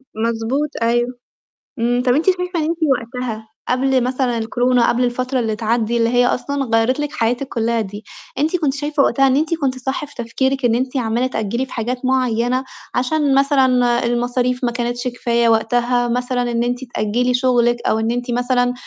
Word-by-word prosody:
مضبوط، 230 +6 -1
أيوه. 240 +1 +2 0.7
إمم. 245 +2 +1
طَب 250 - +4
أنتِ 300 +5 +1
شايفة 360 -2 +1
إن - - 0
أنتِ 325 +2 -1
وقتها 235 -3 -3 0.2
قبل 260 0 +2
مثلًا 250 -1 0
الكورونا، 245 +2 +2
قبل 245 +1 +1
الفترة 255 +2 -1
اللي 220 -3 -1
تعدّي، 230 +1 0
اللي 230 0 +2
هي 245 +1 +3
أصلًا 280 +3 -1
غيّرِت 230 +3 +1
لِك 295 0 -2
حياتِك 245 -1 -1
كلّها 230 -1 0
دي، 205 0 -7 0.3
أنتِ 310 +5 +1
كنتِ 300 -5 0
شايفة 290 0 0
وقتها 270 +2 +3
إن 260 - +3
أنتِ 310 +3 +1
كنتِ 275 -5 -1
صح 265 +5 -3
في 290 - -18
تفكيرِك، 265 +3 -1
إن 230 -1 +3
أنتِ 255 +2 -1
عمّالة 240 +1 0
تأجّلي 235 +1 -2
في - - -12
حاجات 245 +2 -3
معيّنة، 255 -1 +1 0.3
عشان 275 +2 +1
مثلًا 255 -4 +3
المصاريف 245 +1 0
ما 240 - +1
كانتش 240 +1 -3
كفاية 235 -1 +1
وقتها، 240 +2 +2
مثلًا 245 0 -1
إن 235 0 0
أنتِ 245 +1 -2
تأجّلي 240 +4 0
شغلِك، 245 -1 +2
أو 220 - +2
إن 225 +1 0
أنتِ 245 +1 -3
مثلًا 245 0 +1
245 Hz, 180 wpm, -19 LUFS, 235-265 Hz, 0.7 s, طَب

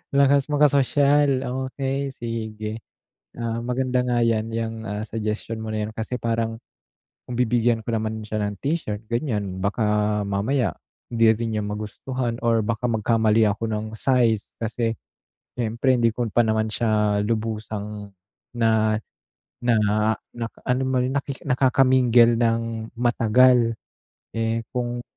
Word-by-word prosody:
lakas 140 0 +4
makasosyal 145 -1 +3 0.2
okey, 135 +1 -2
sige. 110 -2 -5 0.6
Oo 115 0 -2
maganda 125 0 0
nga 120 -1 +1
'yan, 115 -1 +1
'yang, 115 0 -2
ah, 105 +1 -3
suggestion 110 +1 -3
mo 110 - -5
na 105 -1 -1
'yan 110 - -7
kasi 115 +3 -3
parang, 115 -1 -1 0.7
kung 120 - -4
bibigyan 120 -1 +2
ko - - -1
naman 110 0 -2
siya 110 0 -3
ng 105 -1 -3
t-shirt, 135 -8 -2
ganiyan, 105 -7 -2
baka 105 0 +1
mamaya 110 +5 0 0.3
hindi 115 -1 +4
rin 110 0 -2
niya 105 - -1
magustuhan 115 +4 -4
or 115 -1 +3
baka 115 +2 -3
magkamali 110 0 +3
ako 105 +3 -2
ng 105 0 -2
size, 120 -5 +2
kasi 115 0 -1 0.6
siyempre 120 +2 +1
hindi 115 -2 +3
ko 120 -1 -1
pa 120 - +4
naman 110 0 +1
siya 105 -2 +1
lubusang 105 -2 -3 0.5
na 110 -2 +2 0.7
na 120 -1 +4 0.6
na 115 -1 -2 0.2
alam 130 +1 +1
mo 130 -1 +1
yun, 130 +2 -1
na 140 - +1 0.3
nakaka-mingle 125 -3 +4
ng 115 -1 -1
matagal. 120 0 +4 0.6
Eh, 115 0 0
kung 120 -1 -2
115 Hz, 135 wpm, -23 LUFS, 110-125 Hz, 0.7 s, lakas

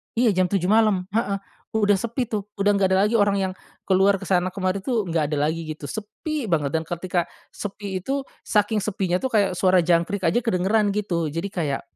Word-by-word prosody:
Iya 235 -1 +4
jam 185 -1 +2
7.00 185 -1 0
malam, 215 -4 +4
heeh, 205 -2 0 0.4
udah 205 -2 +3
sepi 235 +4 -2
tuh, 210 -2 -3
udah 200 +1 +2
nggak 195 -1 +3
ada - - +4
lagi 225 +2 +1
orang 205 -1 +3
yang, - - -9 0.3
keluar 195 +1 +4
ke - - -6
sana 180 -1 +2
kemari 190 0 -1
tuh 235 -3 0
nggak 160 -3 0
ada - - 0
lagi 165 0 -4
gitu, 155 -1 -7
sepi 255 +7 -4
banget 150 -6 0
dan 160 - 0
ketika 175 0 -1 0.3
sepi 200 -2 -5
itu, 270 +9 -2 0.2
saking 210 +1 +2
sepinya 190 -3 -1
tuh 260 - -1
kayak 205 -3 +3
suara 185 -1 +4
jangkrik 175 +4 +1
aja 170 +7 +3
kedengeran 205 0 +2
gitu 175 -6 -1
jadi 165 +6 -3
kayak 150 -8 -2
195 Hz, 200 wpm, -23 LUFS, 175-210 Hz, 0.4 s, Iya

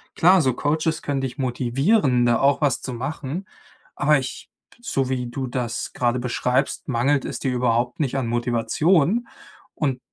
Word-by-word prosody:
Klar, 180 +2 +5
so 130 -4 +2
Coaches 155 +3 -1
können 140 -2 -1
dich 130 +1 -4
motivieren, 130 - +2
da 120 -1 +3
auch 140 +2 +3
was 140 -3 +1
zu 130 - -5
machen, 145 +7 -4 0.5
aber 150 0 +3
ich 130 -1 -6 0.3
so 135 - -1
wie 125 -2 -2
du 130 +2 -4
das 120 -2 -3
grade 120 0 +1
beschreibst, 125 +2 -1
mangelt 135 +2 +1
es - - -4
dir 130 -2 -2
überhaupt 120 +1 0
nicht 140 -3 0
an 135 - -1
Motivation. 140 - +1 0.5
Und 135 -4 -1
130 Hz, 160 wpm, -23 LUFS, 125-150 Hz, 0.5 s, Klar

